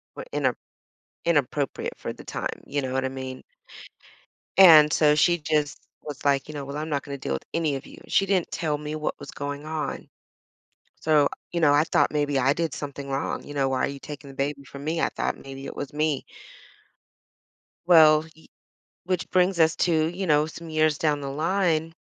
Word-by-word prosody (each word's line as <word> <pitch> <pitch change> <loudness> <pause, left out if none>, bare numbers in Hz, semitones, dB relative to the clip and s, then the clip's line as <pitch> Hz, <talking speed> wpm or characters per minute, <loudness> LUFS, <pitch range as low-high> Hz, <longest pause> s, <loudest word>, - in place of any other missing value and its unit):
were - - -7
ina - - +1 0.7
inappropriate 145 -3 0
for - - -5
the - - -13
time. - - -5
You 145 -1 -2
know 130 -1 -3
what 135 0 0
I - - +1
mean? 130 -1 -7 1.2
And 155 -5 +9
so 150 -1 +4
she 175 +4 +4
just 150 -2 -1 0.2
was 145 -2 -8
like, 140 0 +2
you - - -6
know, 140 -1 -5
"Well, 140 +2 -6
I'm 155 +1 -4
not 140 -2 -1
gonna 140 -1 -6
deal 70 - -3
with 65 - -5
any 155 -4 0
of 135 - -11
you." - - -13
She 195 - +3
didn't 190 -3 +1
tell 150 -3 -1
me 150 +1 -5
what 155 - -3
was - - -9
going 145 +1 -5
on. 155 -1 -4 0.9
So, 150 -2 +3 0.2
you 170 - -1
know, 145 -2 +5
I 150 +2 +5
thought - - +2
maybe 145 -2 0
I 135 +3 +3
did 165 -2 -2
something 140 -1 -6
wrong. 135 +1 -2
You 145 - -9
know, 135 -1 +1
"Why 130 -1 +1
are - - -3
you 140 0 -7
taking 145 -2 -9
the 135 - -12
baby 140 +1 -2
from 140 0 -10
me?" 165 +2 -1
I - - +2
thought - - -2
maybe 135 0 -9
it - - -8
was 140 0 -6
me. 150 -2 0 1.6
Well, 155 -3 +7
y 160 - -19 0.6
which 180 -1 -2
brings 180 -1 +2
us 160 0 +4
to, 160 -3 +2
you 180 +3 -3
know, 150 0 +3
some 165 0 -9
years 155 -1 +2
down 150 -2 +1
the 140 - -5
line 165 +1 0
150 Hz, 205 wpm, -25 LUFS, 140-160 Hz, 1.6 s, And